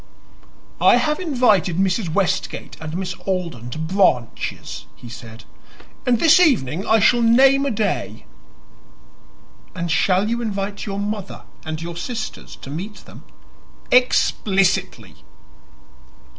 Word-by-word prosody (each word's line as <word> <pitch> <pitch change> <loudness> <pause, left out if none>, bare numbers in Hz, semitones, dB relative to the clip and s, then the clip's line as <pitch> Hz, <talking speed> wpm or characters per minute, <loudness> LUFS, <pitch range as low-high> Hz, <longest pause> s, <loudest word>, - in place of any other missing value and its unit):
"I - - +6
have 300 0 0
invited 245 - +2
Mrs. 190 -1 0
Westgate 195 +2 -2
and 160 +1 -5
Miss 185 -1 -3
Alden 170 - -3
to 125 - -7
Branches," 160 - -1
he - - -13
said, 115 -1 -11 0.6
"and 240 -2 +3
this 325 +4 +6
evening 195 - +2
I 220 - +5
shall 240 +3 +4
name 270 +4 +5
a - - +1
day." 200 - -2 1.5
"And 170 -2 -3
shall 185 +4 +2
you 235 +2 -1
invite 200 -2 -4
your 200 -1 -4
mother 205 -1 -5 0.2
and 155 0 -5
your 170 0 -6
sisters 220 +6 -6
to 135 - -8
meet 195 +8 -7
them?" - - -14 0.7
"Explicitly!" 200 -6 +1
195 Hz, 120 wpm, -21 LUFS, 170-230 Hz, 1.5 s, I